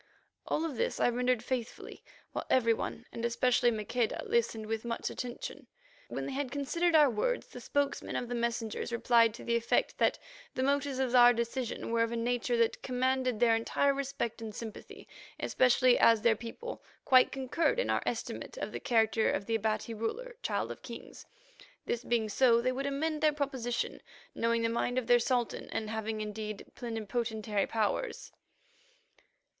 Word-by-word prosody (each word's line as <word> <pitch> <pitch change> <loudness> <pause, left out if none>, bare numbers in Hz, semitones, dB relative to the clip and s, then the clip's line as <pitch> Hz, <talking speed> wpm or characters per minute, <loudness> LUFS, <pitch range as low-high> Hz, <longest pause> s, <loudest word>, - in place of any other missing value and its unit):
All 320 - 0
of 295 -7 -4
this - - -1
I - - +4
rendered 245 -1 +1
faithfully, 245 -2 -5 0.3
while - - -4
every 230 -3 +4
one, 230 +1 -5
and 230 - -6
especially 240 +1 +3
Maqueda, 225 +1 -1
listened 440 - 0
with 220 0 -3
much 235 -1 -3
attention. 245 -1 -6 0.4
When - - -4
they - - -4
had 270 0 -2
considered 320 +5 0
our 300 -2 +7
words, 265 - 0
the - - -11
spokesman 285 -1 -1
of 245 - -2
the 245 - -4
messengers 235 -1 -2
replied 235 -1 +4
to - - -10
the 235 - 0
effect 235 0 +1
that - - +3 0.4
the 260 - 0
motives 280 0 +1
of 260 -2 0
our 245 -1 +8
decision 235 0 -3
were 230 0 +2
of 230 0 +1
a - - -2
nature 240 +1 0
that 230 -1 +1
commanded 255 -2 0
their 230 -1 +5
entire 275 +5 +1
respect 275 -4 -3
and 220 -2 -6
sympathy, 220 -2 -9 0.3
especially 255 0 +4
as 225 -2 +5
their 230 -2 +5
people 245 - -7 0.2
quite 255 -2 +6
concurred 270 - 0
in - - +1
our - - +1
estimate - - -4
of - - -4
the - - -5
character 225 -2 +2
of 200 - -1
the 230 - -2
Abati 220 +1 -1
ruler, 465 - -4
Child - - -1
of - - -9
Kings. - - -10 0.6
This 240 0 -2
being 230 -2 +1
so, 235 +2 +4
they 255 +2 +1
would 275 +2 -2
amend 305 +2 -1
their 305 -1 +4
proposition, 265 -5 -2 0.3
knowing 230 0 +1
the - - +3
mind 235 +2 -1
of 255 - 0
their 245 0 +5
Sultan, 240 -1 -1
and 215 -1 -3
having, 220 0 -3
indeed, 215 0 -5
plenipotentiary 220 -2 -2
powers. 225 - -2
240 Hz, 175 wpm, -31 LUFS, 225-265 Hz, 0.6 s, our